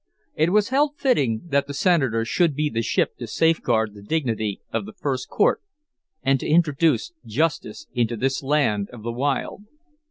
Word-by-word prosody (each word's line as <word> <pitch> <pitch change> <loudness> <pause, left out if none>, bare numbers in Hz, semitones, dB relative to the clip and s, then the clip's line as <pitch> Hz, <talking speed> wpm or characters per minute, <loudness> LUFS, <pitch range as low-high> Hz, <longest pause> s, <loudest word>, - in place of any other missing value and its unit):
It 155 +2 +2
was 210 0 +3
held 290 +2 +1
fitting 135 - +1
that 140 -1 +1
the 140 - -6
Senator 135 - +2
should 165 +3 +1
be 150 0 0
the 115 - -1
ship 115 - 0
to 120 - -6
safeguard 115 -6 +1
the 100 - -12
dignity 110 -5 -2
of 200 - -2
the 215 - -10
first 135 -10 -3
court - - +2 0.6
and 135 0 +2
to - - -4
introduce 155 -3 +2
Justice 130 -1 -2
into 120 -1 0
this 135 +4 0
land 135 -8 +1
of 120 -3 -11
the 115 - -3
wild. 140 - -2
135 Hz, 170 wpm, -23 LUFS, 115-165 Hz, 0.6 s, was